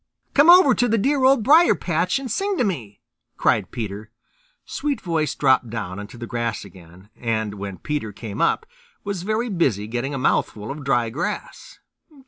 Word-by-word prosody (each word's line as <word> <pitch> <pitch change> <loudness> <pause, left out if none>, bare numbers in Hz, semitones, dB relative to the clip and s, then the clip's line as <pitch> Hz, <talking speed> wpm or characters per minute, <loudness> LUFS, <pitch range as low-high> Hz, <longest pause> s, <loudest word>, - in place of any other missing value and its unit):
"Come 290 +4 +5
over 350 -7 +8
to 245 - +1
the 225 0 +2
dear 270 +5 +1
Old 260 -3 +4
Briar 320 +8 +6
patch 175 - 0
and 265 -4 -5
sing 395 - -1
to - - +2
me," 125 - -4 0.4
cried - - +1
Peter. 105 -1 -6 0.6
Sweetvoice 180 - -2
dropped 130 -4 +3
down 100 -4 -5
into 105 +4 -9
the 120 - -6
grass 115 -3 -3
again, 90 +1 -16
and 110 -3 -2
when 100 -2 -7
Peter 150 -8 -4
came 105 +2 -7
up, 170 - +1 0.4
was 200 -3 -4
very 215 +5 -1
busy 140 - 0
getting 120 +5 -3
a - - -2
mouthful 110 -3 -1
of 145 +1 -7
dry 120 -4 +1
grass. 175 - -5
140 Hz, 170 wpm, -22 LUFS, -, 0.6 s, over